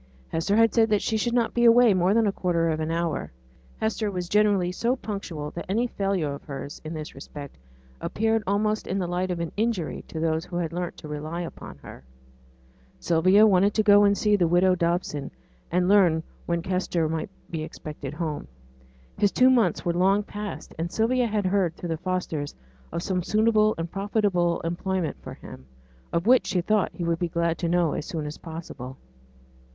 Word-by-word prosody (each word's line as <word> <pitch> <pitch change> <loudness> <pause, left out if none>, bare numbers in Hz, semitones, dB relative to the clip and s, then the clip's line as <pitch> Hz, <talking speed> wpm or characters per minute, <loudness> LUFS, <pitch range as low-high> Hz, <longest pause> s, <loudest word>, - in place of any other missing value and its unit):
Hester 165 +5 0
had 225 0 +4
said 225 -1 +4
that 210 -1 +2
she 225 - 0
should 235 +2 0
not 235 -2 +1
be 240 - +1
away 235 -1 +7
more 185 +2 +2
than 230 -1 +4
a 205 - +2
quarter 170 -3 0
of 155 -1 -1
an 155 0 -2
hour; 165 -1 0
and - - -16 0.5
Hester 220 -1 0
was 180 -3 -4
generally 200 -3 +3
so 235 +7 0
punctual 190 - -5
that 170 - -7
any 225 +5 +1
failure 195 -10 -1
of 140 - -9
hers, 140 0 -7
in 160 +1 -6
this 155 -1 -6
respect, 140 +1 -9 0.5
appeared 225 +1 0
almost 210 +2 0
in 190 - -1
the 185 - -1
light 180 +1 -1
of 175 -1 -2
an 170 -1 -3
injury 215 -6 -1
on - - -1
those 160 0 +1
who 180 -1 -8
had 170 -2 -2
learnt 175 0 -4
to 155 - -9
rely 155 +3 -4
upon 170 - -8
her. 65 - -11 1.0
Sylvia 185 +5 +5
wanted 200 0 +4
to 215 - +3
go 205 -1 +7
and 200 0 +4
see 210 -1 +3
widow 175 +1 +4
Dobson, 170 -5 -1 0.4
and 180 +1 +1
learn 180 -5 +4 0.2
when 170 -1 0
Kester 180 -3 0
might 160 +2 -3 0.2
be 165 -2 -3
expected 150 -2 -7
home. 155 -3 -3 0.7
His 205 -1 +3
two 255 +1 +5
months 225 -9 +2
were 170 - +1
long 195 +4 +3
past; 210 0 -7
and 170 +1 -2
Sylvia 240 +2 +2
had 210 -2 -1
heard 185 -3 +1
through 175 - -6
the 165 - -1
Fosters 165 -5 -3 0.4
of 170 +1 -3
some 185 -2 0
suitable 215 +2 +3
and 165 0 -4
profitable 195 -4 0
employment 175 +1 -2
for - - -8
him, 65 0 -12 0.4
of 170 +2 0
which 250 +2 +5
she 185 -1 +1
thought 210 +2 +1
he 175 - -6
would 170 0 0
be 175 - -1
glad 170 0 0
to 170 - -1
know 175 -2 +2
as - - -4
soon 160 -6 -4
as 150 +1 -6
possible. 160 -6 -8
180 Hz, 200 wpm, -26 LUFS, 165-205 Hz, 1.0 s, away